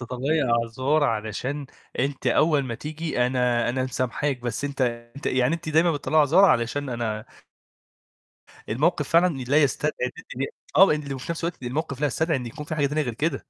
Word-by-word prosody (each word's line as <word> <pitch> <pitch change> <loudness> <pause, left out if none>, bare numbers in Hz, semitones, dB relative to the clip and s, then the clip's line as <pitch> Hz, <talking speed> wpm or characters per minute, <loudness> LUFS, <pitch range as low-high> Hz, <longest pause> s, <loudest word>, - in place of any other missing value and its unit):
تطلّعي 130 +6 -1
أعذار 130 +5 +1
علشان 120 +5 -2 0.3
أنِت 140 +1 -1
أول 150 -3 +3
ما 120 -2 -4
تيجي 155 -3 -2
أنا 125 -2 +1
أنا 130 +1 0
مسامحاك 130 +1 -2
بس 120 +4 -3
أنت 140 -1 -4 0.4
أنت 140 - -7
يعني 130 +4 +2
أنتِ 165 -1 -6
دايمًا 160 +2 +3
بتطلعى 150 +2 0
أعذار 155 +7 +5
علشان 130 -2 +2
أنا 110 -3 -3 1.4
الموقف 150 +5 +1
فعلًا 170 -1 +4
لا 150 +2 +5
يستدعي 150 +2 +1
إن - - -4 0.3
أنتِ - - -1 0.3
آه 195 - +10 0.3
وفي 130 +4 -7
نفس 165 - -5
الوقت 170 -5 -4
الموقف 140 +2 -3
لا 150 - +3
يستدعي 160 +4 0
إن 125 -2 -5
يكون 150 +6 -7
في 155 +1 -4
حاجة 145 -2 +2
تانية 150 +2 0
غير 125 -4 -3
كده. 145 +2 -1
140 Hz, 180 wpm, -25 LUFS, 125-155 Hz, 1.4 s, آه